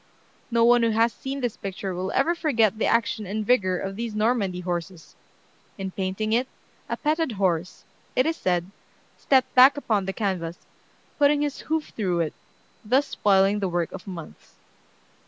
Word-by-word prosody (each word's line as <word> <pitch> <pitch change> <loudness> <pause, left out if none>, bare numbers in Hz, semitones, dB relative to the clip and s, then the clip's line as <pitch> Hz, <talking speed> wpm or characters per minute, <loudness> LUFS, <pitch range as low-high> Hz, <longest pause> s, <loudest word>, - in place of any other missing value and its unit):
No 230 -1 +3
one 240 0 +5
who 230 - +3
has 225 +1 +2
seen 270 +5 -5
this 245 -3 -2
picture 195 -1 -5
will 185 +2 -3
ever 325 +6 +2
forget 230 - +1
the - - +1
action 230 -3 0
and 210 +2 -3
vigor 190 -6 +2
of 195 +2 -4
these 230 0 -4
Normandy 210 -5 0
horses. 175 -1 -5 0.6
In 190 -1 -4
painting 195 +4 -2
it, 245 +3 +2 0.4
a - - -2
petted 310 -3 0
horse, 185 -3 -1 0.3
it 255 - +3
is 325 +1 0
said, 180 - -1 0.5
stepped 265 -2 +2
back 260 +3 +7
upon 215 -8 0
the - - 0
canvas, 180 -5 -2 0.6
putting 290 0 +4
his 290 -2 -3
hoof 315 0 -2
through 180 -5 0
it, 160 - -2 0.5
thus 260 +6 +2
spoiling 195 -1 +3
the 195 -2 -1
work 175 -1 -1
of 190 - -9
months. 170 -4 -10
210 Hz, 170 wpm, -25 LUFS, 185-250 Hz, 0.6 s, back